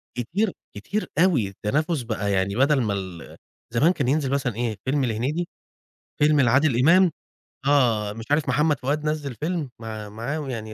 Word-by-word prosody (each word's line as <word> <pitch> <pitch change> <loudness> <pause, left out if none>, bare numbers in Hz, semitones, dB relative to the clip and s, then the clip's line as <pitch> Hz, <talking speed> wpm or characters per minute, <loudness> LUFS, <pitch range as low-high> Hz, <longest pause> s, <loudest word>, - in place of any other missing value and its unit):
كتير 175 - -1 0.2
كتير 155 - -3
أوي، 165 - +3
التنافس 145 - -1
بقى 110 -3 -2
يعني 95 +1 0
بدل 135 +1 +3
ما 105 -3 0
ال 95 -3 -7 0.4
زمان 150 +9 +4
كان 150 - -1
ينزل 135 0 +1
مثلًا 130 -5 -1
إيه 115 -3 -2
فيلم 135 0 +1
لهنيدي، 130 +10 -1 0.7
فيلم 150 -1 +4
لعادل 130 0 +3
إمام، 180 +5 +6 0.6
آه، 115 -7 +3
مش 115 0 -8
عارف 145 -2 +2
محمد 150 +3 +2
فؤاد 145 +3 -1
نزِّل 150 -5 -2
فيلم 155 -1 -3
مع 110 -2 -6
معاهم 135 +7 -4
يعني 110 -3 -5
130 Hz, 160 wpm, -24 LUFS, 110-150 Hz, 0.7 s, إمام